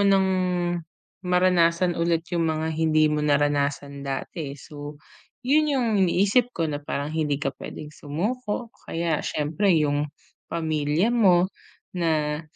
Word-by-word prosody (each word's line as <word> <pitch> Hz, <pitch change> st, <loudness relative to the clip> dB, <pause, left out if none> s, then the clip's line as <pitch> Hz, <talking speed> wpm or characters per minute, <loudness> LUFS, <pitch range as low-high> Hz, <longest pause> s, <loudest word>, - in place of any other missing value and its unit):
nang 195 Hz, -1 st, +4 dB, 0.9 s
maranasan 180 Hz, -1 st, +3 dB
ulit 170 Hz, 0 st, 0 dB
'yong 170 Hz, -, +1 dB
mga 160 Hz, 0 st, -2 dB
hindi 155 Hz, -1 st, +3 dB
mo 150 Hz, 0 st, 0 dB
naranasan 145 Hz, -1 st, 0 dB
dati, 140 Hz, +2 st, -4 dB
eh. -, -, -8 dB
So 145 Hz, 0 st, -9 dB, 0.5 s
'yon 305 Hz, +2 st, +4 dB
'yong 255 Hz, -4 st, +1 dB
iniisip 205 Hz, +7 st, +3 dB
ko 165 Hz, -8 st, -1 dB
na 145 Hz, -1 st, -4 dB
parang 145 Hz, +2 st, -3 dB
hindi 150 Hz, -3 st, 0 dB
ka 135 Hz, -2 st, -2 dB
pwedeng 150 Hz, 0 st, -8 dB
sumuko, 210 Hz, -, -3 dB, 0.2 s
kaya 165 Hz, -2 st, 0 dB
siyempre 160 Hz, +7 st, 0 dB
'yong 150 Hz, -2 st, +2 dB, 0.4 s
pamilya 160 Hz, +6 st, 0 dB
mo 185 Hz, -5 st, +5 dB, 0.5 s
na 155 Hz, -3 st, 0 dB
160 Hz, 130 wpm, -25 LUFS, 150-185 Hz, 0.9 s, mo